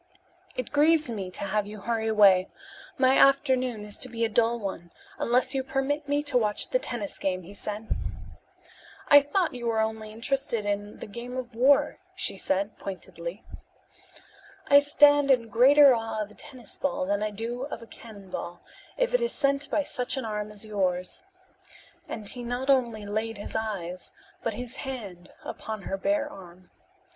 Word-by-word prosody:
"It 255 - -4
grieves 300 -2 +4
me 195 -5 -4
to 185 - -7
have 205 +1 -1
you 210 0 -9
hurry 225 -1 -1
away. 200 -4 +5 0.5
My 260 0 +4
afternoon 255 -5 +3
is 210 - -7
to 255 - -2
be 230 -1 -1
a - - -1
dull 230 +1 +2
one, 190 -5 -6 0.3
unless 250 +3 +2
you 265 -1 0
permit 275 +3 -1
me 290 0 +1
to 285 -4 +3
watch 210 -2 +2
the - - +3
tennis 225 - -3
game," 185 -1 -1
he 190 +4 -11
said. 210 +2 -6 1.2
"I 285 0 +9
thought 325 +4 0
you 240 -1 -4
were 225 -1 +1 0.2
interested 230 +1 -2
only 205 - +1
in 205 +1 -4
the - - -5
game 240 +4 -7
of 250 -2 -5
war," 280 +4 +4 0.2
she 370 - -1
said 195 +2 -1
pointedly. 180 0 -7 1.2
"I 285 - +8
stand 290 0 +5
in 240 -4 +3
greater 270 +5 +7
awe 225 -2 -3
of 210 - -11
a - - -14
tennis 245 +4 -7
ball 275 -9 -1
than 200 +2 0
I 215 - 0
do 230 +5 -4
of 285 - -7
a - - -10
cannonball, 195 -6 -9 0.4
if - - +1
it - - +3
is 475 - 0
sent 280 0 0
by 300 - +1
such 250 -1 -2
an 260 - -3
arm 210 -1 -3
as 210 +1 -5
yours," 185 -4 -1 0.9
and 215 -2 -6
he 245 +4 -2
not 245 +3 0
only 235 -5 +1
laid 215 +2 -3
his 205 - -6
eyes 190 -5 -4 0.3
but 225 -2 -2
his 250 +3 -5
hand 205 -11 -7
upon 215 -2 -6
her 195 - -3
bare 295 +8 0
arm. 180 -8 -13
230 Hz, 175 wpm, -27 LUFS, 205-270 Hz, 1.2 s, I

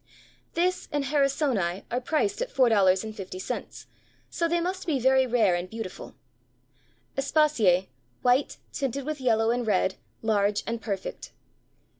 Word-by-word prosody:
This 360 +2 0
and 290 -1 -1
Harrisoni, 270 - +1
are 245 +2 0
priced 385 - 0
at - - -2
$4.50, 200 -5 0 0.5
so 335 - 0
they 340 +1 +1
must 365 +2 -3
be 290 -5 +1
very 260 +1 +4
rare 225 -6 +3
and 175 +1 -2
beautiful. 220 -3 -7 1.0
Aspasie, 275 - +3 0.3
white, 250 +3 +2 0.2
tinted 275 -1 -2
with 305 -2 -4
yellow 225 -2 +3
and 240 -1 -1
red; 190 -2 +1 0.3
large 205 -2 +1
and 230 0 -3
perfect. 200 -4 -5
245 Hz, 125 wpm, -27 LUFS, 205-290 Hz, 1.0 s, very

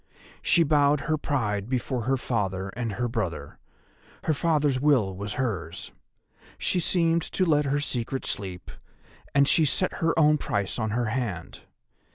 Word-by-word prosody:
She 170 - +4
bowed 145 -1 +3
her 155 - 0
pride 110 -9 -1
before 125 -2 -2
her 135 +1 +2
father 100 -6 -2
and 115 +1 -4
her 120 +4 -1
brother: 115 -2 -4 0.6
her 160 - +1
father's 150 -4 +1
will 125 -10 +2
was 100 +1 -5
hers; 105 -10 -3 0.7
she 180 - 0
seemed 170 -1 +2
to 185 - -1
let 150 -3 +3
her 140 +1 +1
secret 130 -2 -3
sleep, 95 -3 -4 0.6
and 140 0 +5
she 160 - +4
set 170 +5 0
her 165 0 +1
own 150 -1 +5
price 100 -1 -2
on 110 -1 -1
her 120 +3 0
hand. 105 -10 -4
130 Hz, 155 wpm, -26 LUFS, 105-150 Hz, 0.7 s, and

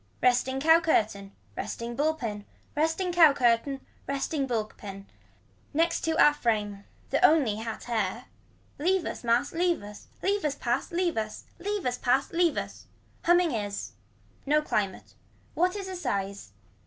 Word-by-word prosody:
Resting 255 +1 +2
cow 320 +3 +6
curtain. 210 -11 0 0.2
Resting 235 +1 -4
bull 310 +4 +1
pin. 215 -8 -5 0.3
Resting 325 +4 0
cow 325 -4 +7
curtain. 260 +1 +1 0.2
Resting 275 0 -1
bull 225 -4 0
pin. 195 -2 -10 0.7
Next 330 +2 +2
to 325 - +1
a 295 - +7
frame. 210 -7 -1 0.3
The - - +1
only 275 -10 +5
hat 225 0 -5
hair. 225 0 -2 0.5
Leave 365 +4 +2
us - - -5
mass 235 +4 +2
leave 345 - +1
us. 205 0 -11 0.2
Leave 400 +1 +1
us 295 -2 0
pass. 250 +4 -1
Leave 345 -3 0
us. 215 -1 -3 0.2
Leave 405 +1 -3
us 250 0 -1
pass 260 +2 +1
leave 340 -2 +2
us. - - -5 0.4
Humming 345 -1 +4
is. 205 -4 -3 0.5
No 300 +2 +2
climate. 200 -9 -2 0.4
What 360 +3 +1
is 395 -2 -5
a 375 - -5
size. 200 - -3
270 Hz, 155 wpm, -28 LUFS, 220-330 Hz, 0.7 s, cow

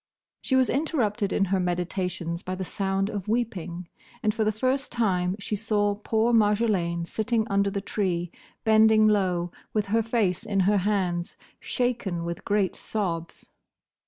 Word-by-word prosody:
She 260 - 0
was 260 -1 +4
interrupted 240 - 0
in 195 - +2
her 190 - +3
meditations 180 -1 -2
by 185 - -4
the 190 0 -4
sound 195 +1 -1
of 205 -2 -5
weeping, 190 -7 -2 0.4
and 215 -1 +2
for 220 - 0
the 215 - +2
first 260 +6 -1
time, 185 -6 +1
she 210 0 -3
saw 205 -1 +1
poor 220 +3 0
Marjolaine 205 -6 +2
sitting 220 +4 0
under 200 0 +2
the 200 0 -3
tree, 180 -4 -2 0.3
bending 220 0 +5
low, 180 -4 +1 0.2
with 210 -2 +1
her 225 - +4
face 215 -5 0
in 195 -2 0
her 200 +3 +3
hands, 185 -2 -1 0.2
shaken 235 -9 -1
with 170 0 -5
great 200 -3 +1
sobs. 170 -6 -4
200 Hz, 155 wpm, -26 LUFS, 180-220 Hz, 0.4 s, bending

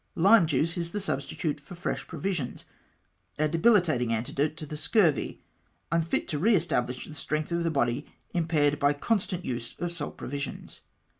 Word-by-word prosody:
Lime 195 +1 +6
juice 160 +4 +1
is 170 +1 -3
the 205 - -1
substitute 160 -5 -2
for 175 +5 -11
fresh 175 - -3
provisions, 165 -4 -3 0.7
a 155 - +2
debilitating 165 - +3
antidote 140 +7 -1
to 155 - -5
the 150 - -6
scurvy 160 - +1 0.2
— - - -40
unfit 165 -1 +1
to 150 - -1
re 215 +7 +5
establish 125 -7 0
the 155 - -10
strength 155 +1 -3
of 170 0 +1
the 165 - +1
body 135 -2 0 0.3
impaired 155 -4 +2
by 145 0 +4
the - - -15
constant 185 -4 0
use 120 -2 -4
of 175 -1 -2
salt 165 -4 -5
provisions. 140 +1 -5
155 Hz, 170 wpm, -28 LUFS, 145-175 Hz, 0.7 s, Lime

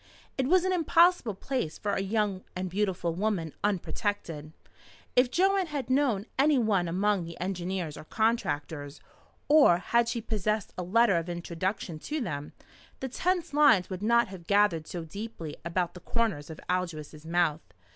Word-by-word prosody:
It 260 -1 0
was 365 +3 +4
an 375 - +1
impossible 335 - +3
place 200 - -3
for 205 - -2
a - - 0
young 200 -1 -1
and 185 0 -3
beautiful 185 -4 -1
woman 180 -4 -1
unprotected. 190 -5 -2 0.6
If 250 0 +5
Joanne 385 +4 +2
had 280 -5 -4
known 255 -7 +2
any 290 +1 +5
one 205 -7 +2
among 195 +2 +1
the 170 0 -9
engineers 180 -3 -3
or - - -8
contractors, 155 -9 -1 0.5
or 290 - +6
had 235 +6 +1
she 235 - -1
possessed 215 -1 -2
a - - -4
letter 200 +2 +3
of 170 +1 -3
introduction 175 0 -3
to 305 - -3
them, 150 - -4 0.5
the 265 - -4
tense 350 +4 -1
lines 285 -12 +5
would 185 0 -4
not 235 +1 +3
have 180 -3 -10
gathered 200 -6 +3
so 175 -2 -5
deeply 170 -3 -7
about 170 +1 -1
the 180 - -10
corners 205 -8 -1
of 160 - -8
Aldous' 160 -4 -3
mouth. 165 -2 +1
195 Hz, 160 wpm, -29 LUFS, 170-235 Hz, 0.6 s, or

